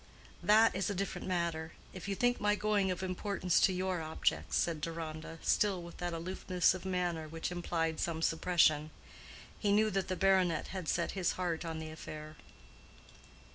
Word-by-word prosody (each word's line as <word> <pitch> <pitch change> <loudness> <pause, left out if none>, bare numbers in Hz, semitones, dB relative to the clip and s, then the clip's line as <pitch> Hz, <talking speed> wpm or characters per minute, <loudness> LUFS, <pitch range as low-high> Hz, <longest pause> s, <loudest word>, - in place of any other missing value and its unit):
"That 215 +4 +5
is 190 +2 0
a 200 - -2
different 195 +1 -3
matter—if 170 +1 -3
you 200 - -1
think 245 +4 +1
my 210 0 +3
going 210 -2 +1
of 185 0 -2
importance 185 -1 0
to - - +5
your 185 -1 -1
object," 90 - -1
said 165 -3 +1
Deronda, 165 0 -5
still 195 -4 +2
with 170 - -10
that 175 -1 -3
aloofness 180 +1 +1
of 185 0 -7
manner 175 -4 -1
which 165 +2 -4
implied 165 -2 -1
some 165 -1 -1
suppression. 160 -3 +3 0.7
He 205 - +1
knew 215 +1 +4
that 195 -1 -1
the 185 - -1
baronet 185 -4 +2
had 185 -4 -4
set 170 - 0
his 185 -3 0
heart 175 -3 -2
on 165 -1 -4
the 160 0 -6
affair. 155 -1 -8
175 Hz, 170 wpm, -33 LUFS, 165-190 Hz, 0.7 s, That